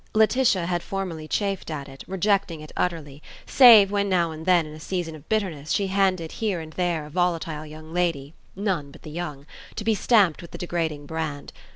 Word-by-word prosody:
Laetitia 220 -4 +3
had 175 0 -1
formerly 175 -6 -5
chafed 195 +1 -2
at 145 -3 -5
it, 135 0 -11
rejecting 190 -3 0
it 155 0 -11
utterly, 155 -5 -3 0.2
save 225 -7 +8
when 200 -1 0
now 170 -3 +2
and 160 +1 -9
then 175 -3 +4
in 150 - -10
a 155 - -10
season 170 0 -3
of 155 -1 -13
bitterness 175 -9 -1
she 195 -1 +1
handed 185 -4 +1
here 210 -6 -2
and 160 -1 -9
there 175 -4 -1
a - - -10
volatile 165 -3 -1
young 155 +1 -11
lady 165 -5 -1 0.2
(none 185 -8 -2
but - - -16
the 155 - -9
young) 150 -4 -6 0.3
to 215 - -4
be 220 +1 +2
stamped 200 -6 +3
with 170 - -11
the - - -9
degrading 165 -4 -3
brand. 155 -2 -5
170 Hz, 200 wpm, -24 LUFS, 155-195 Hz, 0.3 s, save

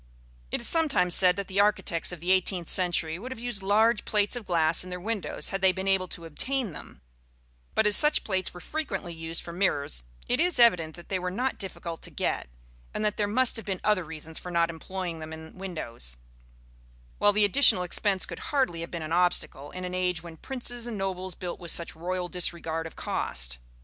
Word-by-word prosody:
It - - -2
is - - -2
sometimes 295 - +2
said 180 -1 +6
that 200 0 -4
the 195 0 -1
architects 195 -5 +2
of 175 -3 -7
the 180 +2 +1
eighteenth 185 -2 +2
century 175 -3 +2
would 250 +6 -7
have 260 - -5
used 230 -4 -2
large 215 +3 +3
plates 205 0 +2
of 235 -4 -6
glass 165 -1 +2
in 185 - -9
their 180 0 -5
windows 210 +1 -2
had 195 - -3
they 190 -1 +6
been 190 +1 -4
able 190 -1 +2
to 170 -1 -7
obtain 245 - -2
them; 65 - -11 0.7
but 220 - +3
as 210 -1 +7
such 300 0 +5
plates 190 -3 -1
were 180 - -10
frequently 195 - -4
used 165 0 -3
for 170 - -8
mirrors, 145 - 0 0.2
it 245 - +1
is 345 -4 +3
evident 175 -10 +5
that 175 - -13
they 190 - 0
were 180 0 -2
not 250 +8 -2
difficult 170 -4 -5
to - - -5
get, - - -2 0.5
and 215 - -1
that 210 - 0
there 205 - +1
must 250 +4 +4
have 225 - -5
been 190 -2 -2
other 210 -3 +2
reasons 160 0 -7
for 180 - -8
not 170 -1 +2
employing 170 0 -5
them 155 0 -7
in 160 0 -10
windows; 115 - -5 1.0
while 205 - +5
the 210 0 +3
additional 205 -4 +7
expense 190 +2 0
could - - -8
hardly 260 - +1
have 170 - -5
been 170 -2 -5
an 155 +1 -4
obstacle 175 -5 +1
in 185 0 -6
an 180 - -5
age 180 -2 0
when 170 -2 -9
princes 245 +4 -3
and 230 -3 -4
nobles 185 -2 -3
built 180 -2 -6
with 175 - -7
such 170 +1 -1
royal 180 +2 -3
disregard 165 -2 -1
of 165 - -13
cost. - - -2
185 Hz, 215 wpm, -28 LUFS, 170-205 Hz, 1.0 s, as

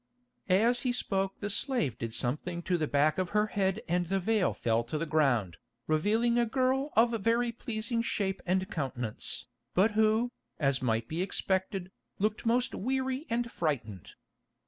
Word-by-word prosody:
As 230 +6 +4
he 250 - +1
spoke 195 -5 -1
the 205 - -2
slave 215 - 0
did 115 -1 -3
something 155 +9 -2
to 180 - +1
the 155 -3 0
back 145 +4 +2
of 185 -2 0
her 210 - +4
head 195 +1 +1
and 175 0 +1
the 195 +2 +1
veil 210 0 +2
fell 115 0 0
to 135 +6 -3
the 165 - -1
ground, 125 - +1 0.3
revealing 220 +10 +2
a 240 - +3
girl 265 +4 +1
of 230 +2 +5
very 235 +3 +2
pleasing 230 0 -2
shape 195 -4 -1
and 185 +1 +1
countenance, 125 -7 -3 0.3
but 200 +4 +4
who, 220 +3 +2 0.3
as 135 -3 +1
might 115 -2 0
be 165 +3 -2
expected, 190 0 -1 0.3
looked 215 +3 -1
most 245 +2 +2
weary 260 - -2
and 235 0 -1
frightened. 115 - -3
195 Hz, 165 wpm, -30 LUFS, 155-230 Hz, 0.3 s, of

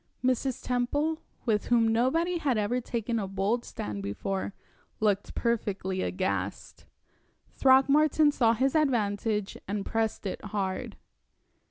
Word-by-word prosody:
Mrs. 255 0 0
Temple, 290 +6 0 0.2
with 215 -3 +1
whom 235 -2 +4
nobody 325 +10 +1
had 275 -7 +1
ever 215 +4 0
taken 230 -1 -2
a 195 - -2
bold 195 +5 0
stand 105 -1 -5
before, 190 - -3 0.4
looked 205 -2 0
perfectly 200 -5 -1
aghast. 95 +2 -3 0.7
Throckmorton 285 +3 +5
saw 230 -5 +3
his 260 +4 +1
advantage, 215 -7 +1
and 200 0 -2
pressed 225 -2 -1
it 190 - -4
hard. 195 -2 -3
225 Hz, 120 wpm, -28 LUFS, 200-260 Hz, 0.7 s, Throckmorton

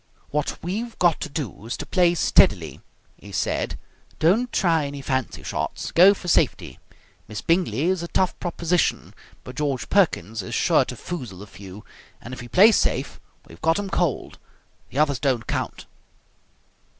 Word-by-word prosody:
"What 150 0 -1
we've 220 +7 -4
got 175 -3 +2
to - - -4
do 130 - -6
is 120 - -3
to - - -6
play 175 -2 +2
steadily," 85 - +3 0.4
he - - -13
said. - - -2 0.4
"Don't 220 +10 +2
try 165 -6 +2
any 140 0 -7
fancy 130 -2 -2
shots. - - -4
Go 190 +4 +7
for 180 - -10
safety. 115 - +1 0.5
Miss 105 0 -6
Bingley 165 - +1
is 185 +1 +1
a 170 - -4
tough 185 +1 +1
proposition, 175 0 -1 0.3
but 125 - -10
George 140 -4 -2
Perkins 115 - +1
is 90 - -5
sure - - +3
to - - -7
foozle 125 - -7
a - - -10
few, 100 0 -12 0.3
and 125 - -10
if 125 - -7
we 120 - -9
play 200 - +6
safe - - 0 0.3
we've 85 - -15
got 165 +1 +2
'em 200 -1 -4
cold. 175 -7 -1 0.5
The - - -8
others 145 -3 +2
don't 130 -5 0
count." - - -4
150 Hz, 165 wpm, -23 LUFS, 120-175 Hz, 0.5 s, Go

